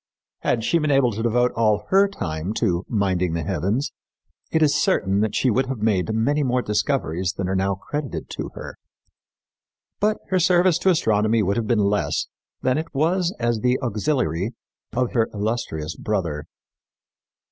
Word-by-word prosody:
Had 115 - 0
she 170 - +2
been 155 -1 0
able 135 -3 +4
to 110 +1 -4
devote 120 +2 +2
all 105 -2 +1
her 195 +1 +5
time 90 - -4
to 90 -7 0
"minding 95 -5 0
the 85 -1 -2
heavens," 100 +7 -1 0.6
it 160 -1 +3
is 145 -2 +4
certain 100 - +2
that 105 0 0
she 130 - +2
would 130 +4 +1
have 135 -1 -3
made 105 -2 +1
many 145 +7 +1
more 125 -2 +1
discoveries 100 - 0
than 95 -2 -3
are 95 - -1
now 95 +1 +1
credited 145 +8 -5
to - - -5
her; - - -8 1.2
but 215 +1 +2
her 185 - +2
service 180 0 +4
to 190 - +2
astronomy 110 - +2
would 100 +1 +1
have 115 -2 -1
been 105 -4 +2
less 100 0 0 0.4
than 130 +3 +2
it 160 +1 -6
was 170 +5 +2
as 120 -1 0
the 125 +2 +1
auxiliary 110 - -1 0.4
of 125 +1 0
her 115 -2 +2
illustrious 100 -8 -2
brother. 85 -8 -2
115 Hz, 170 wpm, -23 LUFS, 100-140 Hz, 1.2 s, her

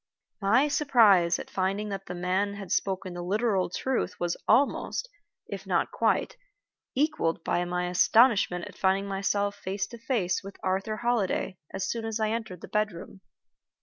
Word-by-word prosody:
My 230 +9 +4
surprise 225 - +4
at - - -9
finding 195 +3 -1
that 195 -1 -5
the 180 - -5
man 185 +3 0
had 195 -3 -8
spoken 190 -2 -1
the 175 - -5
literal 195 0 +1
truth 205 0 -2
was 175 -1 -1
almost, 275 - +2 0.4
if - - -7
not - - +1
quite, - - 0 0.6
equaled 255 - 0
by 175 - 0
my 180 0 -1
astonishment 195 -1 +4
at - - -11
finding 195 +1 +1
myself 200 +1 0
face 195 0 -3
to 235 - -10
face 215 -8 0
with 195 0 -10
Arthur 195 +3 -1
Holliday 215 -6 -1
as 190 - -3
soon 230 -1 -3
as 225 0 -3
I 215 0 +1
entered 220 -6 -4
the - - -8
bedroom. 200 -2 -3
195 Hz, 160 wpm, -28 LUFS, 185-225 Hz, 0.6 s, My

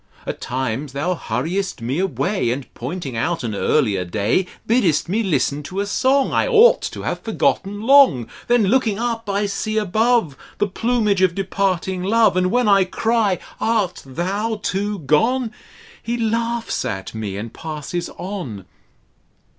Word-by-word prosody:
At - - -5
times 130 +2 -3
thou 155 +6 0
hurriest 180 +2 -2
me 125 +7 -2
away. 190 - 0
And, 130 +2 -2
pointing 135 0 -5
out 165 +7 -1
an 115 -3 -2
earlier 100 -3 +1
day, 100 - 0 0.2
Biddest 215 - +2
me 205 +6 0
hsten 150 - 0
to 185 +5 -5
a 200 - 0
song 260 +6 +2
I - - +2
ought 475 0 +6
to - - -8
have - - -2
forgotten 205 +1 -1
long: 260 - +5 0.2
Then, 240 -2 +4
looking 220 0 +2
up, 230 -2 -2
I 200 +1 +1
see 215 +2 -2
above 215 - +2 0.2
The - - +2
plumage 210 -1 0
of 185 -2 +3
departing 190 -1 -1
Love, 220 +2 +3
And 185 0 +2
when 245 +2 +2
I 200 -1 +5
cry, 215 0 +1 0.2
Art 215 -6 0
thou 195 - -2
too 205 +2 -1
gone? 225 - +1 0.5
He 235 +1 -2
laughs 230 +1 -1
at 95 0 -4
me 105 -3 -4
and 110 +2 -6
passes 160 +2 -5
on. 165 - -6
195 Hz, 155 wpm, -21 LUFS, 150-225 Hz, 0.5 s, ought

